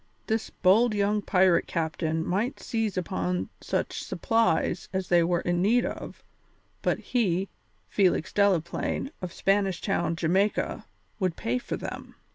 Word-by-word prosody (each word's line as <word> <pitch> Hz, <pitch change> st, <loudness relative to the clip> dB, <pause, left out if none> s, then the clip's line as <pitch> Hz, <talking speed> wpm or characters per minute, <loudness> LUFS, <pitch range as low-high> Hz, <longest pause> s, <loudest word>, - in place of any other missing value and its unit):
This 220 Hz, -1 st, -1 dB
bold 215 Hz, +5 st, +3 dB
young 205 Hz, +1 st, +1 dB
pirate 185 Hz, -3 st, +3 dB
captain 160 Hz, 0 st, -1 dB
might 220 Hz, +10 st, -1 dB
seize 220 Hz, -4 st, -2 dB
upon 90 Hz, -, -2 dB
such -, -, -2 dB
supplies 180 Hz, -3 st, +1 dB
as 190 Hz, -1 st, -3 dB
they 175 Hz, -1 st, +5 dB
were 175 Hz, 0 st, +1 dB
in 175 Hz, 0 st, 0 dB
need 235 Hz, +6 st, +3 dB
of, -, -, -6 dB, 0.6 s
but -, -, +1 dB
he, 195 Hz, -6 st, 0 dB, 0.4 s
Felix 185 Hz, -5 st, +1 dB
Delaplaine, 200 Hz, -, +1 dB
of 180 Hz, -2 st, -4 dB
Spanish 195 Hz, -2 st, +1 dB
Town, 170 Hz, -4 st, 0 dB
Jamaica, 185 Hz, +5 st, 0 dB, 0.3 s
would 185 Hz, -4 st, 0 dB
pay 120 Hz, +2 st, -1 dB
for -, -, -4 dB
them. -, -, -7 dB
185 Hz, 135 wpm, -27 LUFS, 170-205 Hz, 0.6 s, they